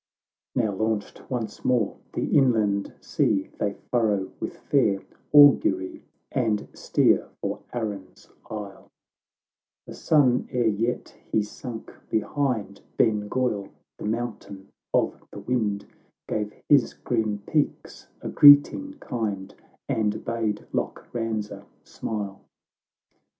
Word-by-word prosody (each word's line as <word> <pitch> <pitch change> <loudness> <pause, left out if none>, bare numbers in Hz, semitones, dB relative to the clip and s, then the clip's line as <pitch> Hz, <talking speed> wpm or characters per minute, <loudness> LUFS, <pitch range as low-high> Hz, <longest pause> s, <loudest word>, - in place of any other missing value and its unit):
XIII 125 - +3
Now 105 - 0
launched 110 -1 -2
once 120 -4 -4
more, 120 -5 +1 0.2
the - - -1
inland 110 -7 +3
sea 95 -2 0
They 100 -1 0 0.2
furrow 105 -6 +1
with - - -5
fair 105 -9 +1 0.3
augury, 135 -10 +5 0.3
And 110 -5 0
steer - - +2
for - - -3
Arran's 105 -5 -5 0.2
isle; 105 -3 -7 1.0
The - - -9
sun, 135 -6 +3
ere 120 -3 +2
vet 115 +4 -2 0.2
he 105 - +3
sunk 115 +2 -8 0.2
behind 110 -4 -1 0.2
Ben 105 -2 +2
Ghoil, 115 -6 -1 0.3
"The - - -6
Mountain 105 -3 -4 0.2
of - - +1
the - - -9
Wind," 105 -5 -1 0.4
Gave 105 -1 -2 0.2
his 140 -4 +4
grim 110 -4 -1
peaks 150 -2 -2
a - - -4
greeting 145 - +7
kind, 110 - -4 0.3
And 105 -1 -1
bade 110 -3 -2
Loch - - -3
Banza 110 -4 -3 0.2
smile. 100 -3 -5
110 Hz, 115 wpm, -25 LUFS, 105-125 Hz, 1.0 s, greeting